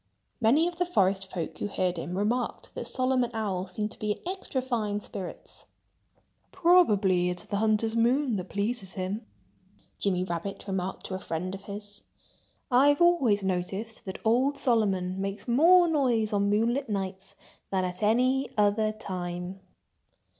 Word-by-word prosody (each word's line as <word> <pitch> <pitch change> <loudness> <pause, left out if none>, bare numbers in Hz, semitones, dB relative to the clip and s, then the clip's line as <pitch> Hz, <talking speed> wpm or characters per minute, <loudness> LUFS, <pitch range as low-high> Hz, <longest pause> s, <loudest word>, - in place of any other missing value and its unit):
Many 275 +9 +4
of 350 -1 -5
the 360 - +1
forest 195 - +1
folk 170 -3 -5
who - - -1
heard 185 -3 -1
him 175 +2 -4
remarked 235 +5 -1
that - - -5
Solomon 255 -2 +1
Owl 195 -4 -2
seemed 210 +3 -3
to - - -11
be 210 -1 0
in - - -16
extra 370 -7 -3
fine 225 -5 -1
spirits. 195 -3 -8 0.8
"Probably 210 - +4
it's 180 0 -4
the 200 - -3
hunter's 220 +1 +1
moon 245 +2 +2
that 185 0 -6
pleases 200 -2 -3
him!" 195 +4 -4 0.7
Jimmy 185 -2 +1
Rabbit 185 +2 -4
remarked 190 -1 -3
to - - -5
a 185 - -3
friend 180 +2 -4
of 195 0 -8
his. 205 0 -7 0.7
"I've 285 +4 +5
always 275 - +4
noticed 190 +4 -3
that 190 - -5
old 260 +6 +3
Solomon 195 -7 +1
makes 195 +4 -4
more 340 +9 +6
noise 245 -9 +1
on 200 0 +2
moonlight 235 +5 +1
nights 195 -1 -4 0.3
than 190 -1 0
at 180 +1 -5
any 255 +5 +2
other 210 +1 +3
time." 180 -3 -5
210 Hz, 155 wpm, -28 LUFS, 190-245 Hz, 0.8 s, more